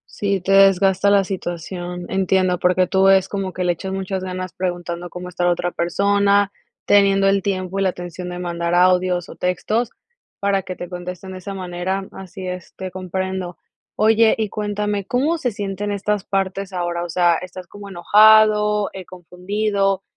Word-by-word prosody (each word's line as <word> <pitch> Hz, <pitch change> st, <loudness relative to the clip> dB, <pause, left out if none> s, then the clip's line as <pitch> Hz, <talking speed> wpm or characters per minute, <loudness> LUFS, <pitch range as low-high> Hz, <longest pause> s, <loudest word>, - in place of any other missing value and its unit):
Sí, 200 Hz, -2 st, -1 dB
te 195 Hz, -, -2 dB
desgasta 195 Hz, 0 st, +5 dB
la 200 Hz, -1 st, +4 dB
situación. 175 Hz, -1 st, -5 dB
Entiendo, 185 Hz, -1 st, +1 dB
porque 185 Hz, +1 st, +3 dB
tú 190 Hz, +1 st, +3 dB
es 190 Hz, -1 st, +4 dB
como 195 Hz, -2 st, -3 dB
que 185 Hz, -, -3 dB
le 180 Hz, -, +2 dB
echas 190 Hz, +3 st, -6 dB
muchas 190 Hz, 0 st, -3 dB
ganas 185 Hz, 0 st, -5 dB
preguntando 175 Hz, -2 st, -4 dB
cómo 180 Hz, +1 st, -8 dB
está 180 Hz, 0 st, -4 dB
la 175 Hz, -, +4 dB
otra 175 Hz, 0 st, 0 dB
persona, 200 Hz, +3 st, +2 dB, 0.3 s
teniendo 195 Hz, -1 st, +4 dB
el 195 Hz, 0 st, +3 dB
tiempo 190 Hz, 0 st, -2 dB
y -, -, +1 dB
la 190 Hz, -, +3 dB
atención 180 Hz, 0 st, -7 dB
de 175 Hz, -, -6 dB
mandar 170 Hz, -1 st, -2 dB
audios 180 Hz, -1 st, +3 dB
o -, -, -11 dB
textos, 210 Hz, +6 st, -1 dB, 0.5 s
para 200 Hz, -1 st, +1 dB
que 185 Hz, 0 st, -7 dB
te 175 Hz, -, -7 dB
contesten 180 Hz, +1 st, -7 dB
de 185 Hz, -, -7 dB
esa 195 Hz, +2 st, -7 dB
manera. 185 Hz, +1 st, -3 dB
Así 190 Hz, 0 st, -9 dB
es, 180 Hz, -1 st, -7 dB
te 185 Hz, -1 st, -6 dB
comprendo. 185 Hz, 0 st, -4 dB, 0.4 s
Oye, 220 Hz, +1 st, +4 dB
y 215 Hz, -2 st, -1 dB
cuéntame, 210 Hz, -1 st, -2 dB
¿cómo 295 Hz, +9 st, 0 dB
se 250 Hz, -, 0 dB
sienten 205 Hz, -1 st, -4 dB
estas 205 Hz, 0 st, -1 dB
partes 195 Hz, 0 st, -2 dB
ahora, 175 Hz, -1 st, -2 dB
o 175 Hz, -, -6 dB
sea, 175 Hz, 0 st, +3 dB
estás 185 Hz, 0 st, -8 dB
como 200 Hz, +2 st, -11 dB
enojado, 210 Hz, +2 st, +5 dB
eh, 190 Hz, -2 st, -8 dB
confundido, 195 Hz, +2 st, -2 dB
190 Hz, 175 wpm, -20 LUFS, 180-200 Hz, 0.5 s, desgasta